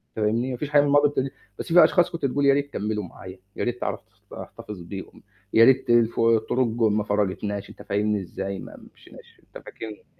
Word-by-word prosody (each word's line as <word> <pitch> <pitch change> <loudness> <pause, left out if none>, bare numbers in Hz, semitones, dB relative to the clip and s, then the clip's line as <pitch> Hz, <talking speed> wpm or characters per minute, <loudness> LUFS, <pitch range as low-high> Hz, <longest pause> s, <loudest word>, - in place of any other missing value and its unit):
فاهمني؟ 115 +4 0
ما 125 - -4
فيش 145 +3 -4
حاجة 145 -1 +5
من 145 - 0
الماضي 145 0 +4
بت 135 -2 -2 0.3
بس 165 - -4
في 175 - +9
أشخاص 175 -1 +3
كنت 170 -5 -3
تقول 140 +1 0
يا 140 - +6
ريت 145 0 -2
كملوا 105 0 -2
معايا، 95 +1 -11 0.2
يا - - -3
ريت 120 0 -3
تعرف - - -2
تخط 105 -2 -23
تحتفظ 105 -5 -10
بيهم، 95 +3 -9 0.3
يا 115 +1 +7
ريت 130 -1 +3
الف 120 -1 +3
الطرق 115 +2 +2
ما 110 -2 +1
فرّقتناش، 100 0 -2
أنت - - -13
فاهمني 105 +1 0
إزاي، 95 +1 -5
ما - - -10 0.2
مشيناش - - -17
أنت - - -13
فاكرني 110 - -8
يعني - - -27
115 Hz, 210 wpm, -24 LUFS, 105-135 Hz, 0.3 s, في